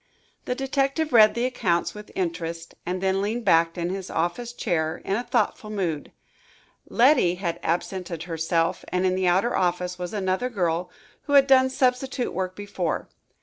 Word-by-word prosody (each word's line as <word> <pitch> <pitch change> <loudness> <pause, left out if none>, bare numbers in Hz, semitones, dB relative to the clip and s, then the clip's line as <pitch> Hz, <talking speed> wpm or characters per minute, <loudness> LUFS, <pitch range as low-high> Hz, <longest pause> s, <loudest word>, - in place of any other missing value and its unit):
The 250 - -1
detective 275 +3 0
read 215 -2 +7
the 235 +1 0
accounts 180 -9 0
with 210 0 -10
interest 165 -2 -3
and 180 +1 -2
then 190 0 +1
leaned 225 +3 -2
back 165 -2 +3
in 175 +1 -2
his 190 -1 -5
office 175 +9 -2
chair 160 -9 -1
in 195 - 0
a 235 - 0
thoughtful 215 -3 -1
mood. 180 -8 -3 0.8
Letty 245 - +4
had 170 -2 -3
absented 175 -1 -2
herself 165 0 -1
and 180 +1 0
in 185 - +2
the 185 0 0
outer 190 +7 +2
office 180 0 0
was 180 -1 -4
another 195 +4 -1
girl, 175 -5 -1 0.4
who 285 - -2
had 280 -1 +7
done 260 -1 +5
substitute 260 -1 0
work 185 0 -3
before. 200 -5 -3
190 Hz, 165 wpm, -25 LUFS, 175-240 Hz, 0.8 s, read